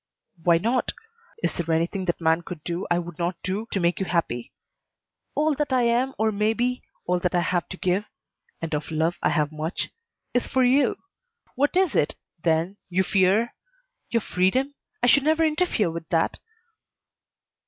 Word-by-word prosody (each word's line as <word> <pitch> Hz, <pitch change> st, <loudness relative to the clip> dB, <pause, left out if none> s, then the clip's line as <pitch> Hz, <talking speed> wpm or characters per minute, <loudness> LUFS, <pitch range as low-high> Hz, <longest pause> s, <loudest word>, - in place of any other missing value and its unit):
"Why 170 Hz, 0 st, +5 dB
not? 235 Hz, +8 st, 0 dB, 0.5 s
Is -, -, +1 dB
there 165 Hz, -1 st, 0 dB
anything 175 Hz, +4 st, -1 dB
that 175 Hz, -, -1 dB
man 165 Hz, 0 st, +3 dB
could 170 Hz, -3 st, -8 dB
do 175 Hz, +1 st, -3 dB
I 175 Hz, -, +3 dB
would 175 Hz, -2 st, -5 dB
not 175 Hz, +1 st, 0 dB
do 200 Hz, +5 st, -2 dB
to 195 Hz, -, -1 dB
make 175 Hz, 0 st, +1 dB
you 190 Hz, -, -1 dB
happy? 120 Hz, -9 st, -1 dB, 0.8 s
All 305 Hz, +1 st, +3 dB
that 290 Hz, -1 st, -2 dB
I 255 Hz, -2 st, +3 dB
am 245 Hz, +3 st, +2 dB
or 220 Hz, 0 st, +2 dB
may 210 Hz, +1 st, +1 dB
be, 250 Hz, +2 st, 0 dB, 0.2 s
all 180 Hz, 0 st, +1 dB
that 180 Hz, 0 st, 0 dB
I 175 Hz, -, +4 dB
have 175 Hz, 0 st, 0 dB
to 190 Hz, -, -6 dB
give 185 Hz, +3 st, +1 dB, 0.5 s
and 165 Hz, -1 st, -4 dB
of 150 Hz, 0 st, -2 dB
love 160 Hz, +2 st, 0 dB
I -, -, +3 dB
have 150 Hz, -2 st, +1 dB
much 155 Hz, +3 st, -3 dB, 0.4 s
is 245 Hz, -, +1 dB
for 260 Hz, -, +2 dB
you. 255 Hz, +1 st, +4 dB, 0.6 s
What 290 Hz, +6 st, +1 dB
is 375 Hz, -5 st, +3 dB
it, 150 Hz, -, +2 dB, 0.3 s
then, 165 Hz, +4 st, +1 dB
you 185 Hz, +1 st, +2 dB
fear? 195 Hz, +5 st, +3 dB, 0.6 s
Your 230 Hz, -, +1 dB
freedom? 235 Hz, +11 st, +1 dB, 0.3 s
I -, -, +6 dB
should 275 Hz, +3 st, +6 dB
never 315 Hz, +3 st, +3 dB
interfere 305 Hz, -, +1 dB
with 165 Hz, +1 st, -7 dB
that." 165 Hz, -3 st, +1 dB
185 Hz, 180 wpm, -25 LUFS, 170-245 Hz, 0.8 s, I